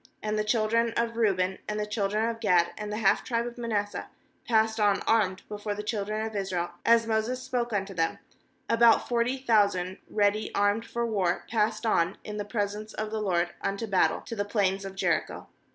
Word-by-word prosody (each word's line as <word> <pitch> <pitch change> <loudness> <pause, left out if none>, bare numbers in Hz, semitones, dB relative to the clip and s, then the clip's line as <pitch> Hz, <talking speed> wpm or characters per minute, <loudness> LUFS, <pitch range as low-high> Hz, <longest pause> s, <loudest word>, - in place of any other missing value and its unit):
^And 215 0 -1
the 215 - +1
children 225 +1 +1
of 235 0 0
Reuben, 190 -5 +1
and 210 0 -2
the 210 - -1
children 210 +1 0
of 230 -1 -3
Gad, 180 -6 +3
and 210 -1 -5
the 210 - -2
half 200 -3 +3
tribe 235 -1 -1
of 240 0 -7
Manasseh, 210 -3 -2 0.4
passed 220 -1 +2
on 205 -2 +3
armed 200 -5 +1
before 210 0 -4
the 210 - -5
children 215 0 -2
of 220 -1 -6
Israel, 185 -3 -2
as 230 0 +5
Moses 225 +3 -1
spoke 240 -1 -2
unto 195 -1 -2
them; 165 -2 0 0.5
13about 230 0 +5
forty 240 +2 +1
thousand 200 -7 +1
ready 210 0 +1
armed 205 +3 +1
for 235 0 -2
war 190 -6 0
passed 215 0 0
on 180 -4 +2
in 210 0 -6
the 205 - -3
presence 210 0 -3
of 215 0 -3
the 220 -1 -2
LORD 175 -3 +1
unto 200 +3 -2
battle, 195 -4 +2
to 230 - -7
the 205 - 0
plains 195 -2 0
of 195 0 -7
Jericho. - - -1
210 Hz, 195 wpm, -28 LUFS, 200-225 Hz, 0.5 s, as